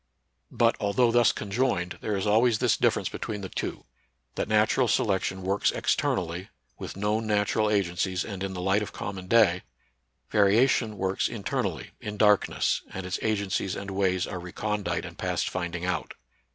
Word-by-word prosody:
But, 115 -1 +2
although 115 +3 +2
thus 120 0 +5
conjoined, 100 -4 -1
there 105 -2 -1
is 95 - -2
always 110 +2 +4
this - - +2
difference - - +1
between 105 -2 -5
the 95 - -6
two, - - -4 0.5
that - - -2
natural 110 +4 +3
selection 95 -3 0
works 95 +2 +1
externally, 90 +1 -1 0.3
with - - -7
known 105 +2 0
natural 105 +1 +1
agencies, 95 -2 0
and 100 -4 -6
in 95 -1 -3
the 90 - -4
light 95 +2 +2
of 105 - -5
common 95 -2 -6
day; 100 -5 +4 0.7
variation 110 +1 +3
works 95 0 0
in - - -7
ternally, - - -2
in 105 0 -6
darkness, 105 -1 +3
and 95 -1 -6
its 90 +1 -3
agencies 100 -3 -1
and 100 0 -6
ways 95 -2 +1
are 95 - -5
recondite 105 +4 -3
and - - -10
past - - -1
finding 85 -1 -3
out. 90 -3 -2
100 Hz, 165 wpm, -27 LUFS, 95-110 Hz, 0.7 s, thus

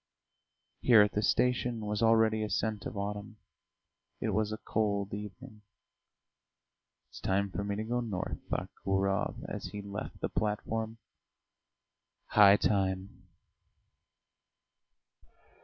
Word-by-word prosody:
Here 115 -4 +7
at 105 - 0
the 105 - 0
station 120 0 +1
was 105 +1 -2
already 110 -1 +4
a 105 - -2
scent 105 +1 -1
of 115 - -7
autumn; 105 +2 -4 0.8
it 110 - -1
was 105 +1 0
a 110 - -3
cold 100 -3 -1
evening. 105 +3 -8 1.5
"It's - - -11
time 100 +1 0
for 100 - -3
me 100 0 -2
to 110 - -2
go 120 +2 -1
north," 105 -6 -3
thought - - -2
Gurov 95 0 0
as - - -5
he 105 -1 -6
left 100 +1 -6
the - - -1
platform. 110 +1 -2 1.3
"High 100 -1 +7
time!" 95 -1 -1
105 Hz, 120 wpm, -31 LUFS, 100-110 Hz, 1.5 s, Here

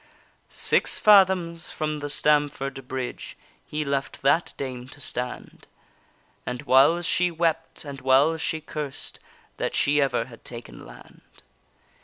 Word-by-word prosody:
Six - - +2
fathoms 185 -5 +4
from 155 -1 -3
the 145 0 -5
Stamford 145 -3 0
bridge 130 -1 -5 0.3
He 150 0 -3
left 140 -1 -3
that 160 +5 +2
dame 130 -2 -5
to 145 - -14
stand, 125 -2 -5 0.8
And 125 0 -5
whiles 145 +7 +4
she 180 0 +2
wept, 165 -1 -2
and 140 -2 -8
whiles 140 +5 +3
she 160 0 -2
cursed 150 -3 -6 0.4
That - - -2
she 145 +1 +3
ever 125 -4 0
had 115 -2 -15
taken 120 - -9
land. - - -15
145 Hz, 130 wpm, -25 LUFS, 130-160 Hz, 0.8 s, fathoms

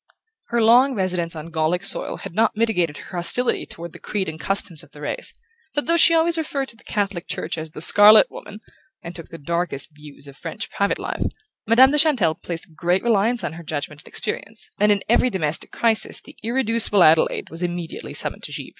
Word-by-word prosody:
Her 235 -1 0
long 250 +4 +5
residence 180 -4 -2
on 160 +1 -8
Gallic 165 +3 -1
soil - - +4
had 195 - -9
not 220 +2 +1
mitigated 180 -9 0
her 180 - -9
hostility 240 +8 +2
toward 170 0 -9
the - - -12
creed 200 -3 -3
and 160 0 -6
customs 180 -4 -1
of 165 - -14
the 145 - -13
race, 145 - -3 0.4
but 290 - 0
though 335 - +2
she 335 0 +5
always 330 0 +2
referred 280 -4 -3
to - - -11
the 230 - -20
Catholic 200 -4 -3
Church - - -4
as 160 -1 -7
the 155 - -10
Scarlet 210 +3 +7
Woman 210 +1 -11 0.4
and 170 0 -8
took 165 - -9
the 165 - -10
darkest 165 -1 -3
views 150 -1 -12
of 140 - -12
French 165 +3 -6
private 200 0 0
life, - - -5 0.5
Madame 255 +4 +6
de 295 - +3
Chantelle 260 - +3
placed 165 0 -8
great 175 +4 0
reliance 230 0 +1
on 170 - -3
her 170 +1 -10
judgment 150 -1 -5
and - - -18
experience, 215 0 -5
and 210 +1 +4
in 200 -1 0
every 240 +2 +3
domestic 165 -7 -1
crisis 225 -2 +2
the - - -16
irreducible 230 -4 +2
Adelaide 160 0 +3
was 165 +2 -8
immediately 175 -2 -5
summoned - - -1
to - - -6
Givre. - - -6
190 Hz, 210 wpm, -21 LUFS, 165-230 Hz, 0.5 s, Scarlet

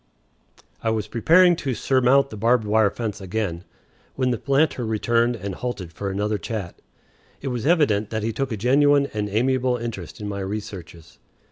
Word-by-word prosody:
I 115 - 0
was 110 -2 -1
preparing 170 +11 +5
to 135 -6 -2
surmount 135 +3 +3
the - - -6
barbed 115 +2 +2
wire 105 0 +3
fence 110 -2 -5
again, 95 -3 -3 0.5
when 130 -1 +1
the 120 - -2
planter 140 -1 +1
returned 115 +2 +1
and 100 -3 -5
halted 95 -7 -5
for 100 +4 -4
another 105 +2 -1
chat. 105 -6 -6 0.6
It 135 - -4
was 125 +1 -3
evident 140 - +2
that 110 -1 -3
he 115 +1 -1
took 135 +2 -2
a 110 - -2
genuine 140 +5 +3
and 105 -1 -2
amiable 125 +3 +1
interest 115 -8 -6
in 105 - -5
my 100 -1 -4
researches. 95 -5 -7
110 Hz, 170 wpm, -23 LUFS, 105-130 Hz, 0.6 s, preparing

